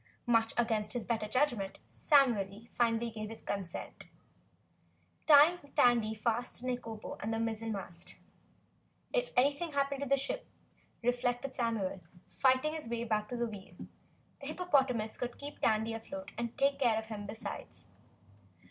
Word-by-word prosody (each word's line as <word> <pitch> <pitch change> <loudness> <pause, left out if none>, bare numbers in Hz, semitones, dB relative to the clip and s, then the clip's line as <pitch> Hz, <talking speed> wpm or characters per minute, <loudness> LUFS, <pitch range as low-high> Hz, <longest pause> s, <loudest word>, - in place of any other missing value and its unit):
Much 230 -2 +3
against 220 -3 +1
his 245 -3 -3
better 225 -3 -1
judgment, 235 -5 +1
Samuel 230 -8 +3
finally 235 -1 +1
gave 215 -1 -5
his 225 - -9
consent, 190 -4 -5 1.2
tying 310 +4 +8 0.2
Tandy 230 -3 +4
fast 230 +3 -1
to 250 - -8
Nikobo 240 -4 -4
and 215 - -2
the 225 - 0
mizzenmast. 220 -6 -3 1.0
If - - +1
anything 285 +5 +2
happened 280 0 0
to 280 - -2
the 275 - +5
ship, 275 - -3 0.6
reflected 245 +2 0
Samuel, 225 -7 -1 0.3
fighting 260 +3 +3
his 310 -7 -6
way 235 0 -1
back 215 -2 0
to 245 - -3
the 240 - +1
wheel, 205 -3 -10 0.6
the 275 - -7
hippopotamus 270 -10 +1
could 245 -1 -4
keep 290 +1 -7
Tandy 220 +1 +2
afloat 285 +6 -7
and 235 0 -4
take 275 0 +2
care 235 -5 +3
of 220 - -2
him 210 -2 -6
besides. 215 +2 -7
235 Hz, 145 wpm, -33 LUFS, 220-275 Hz, 1.2 s, tying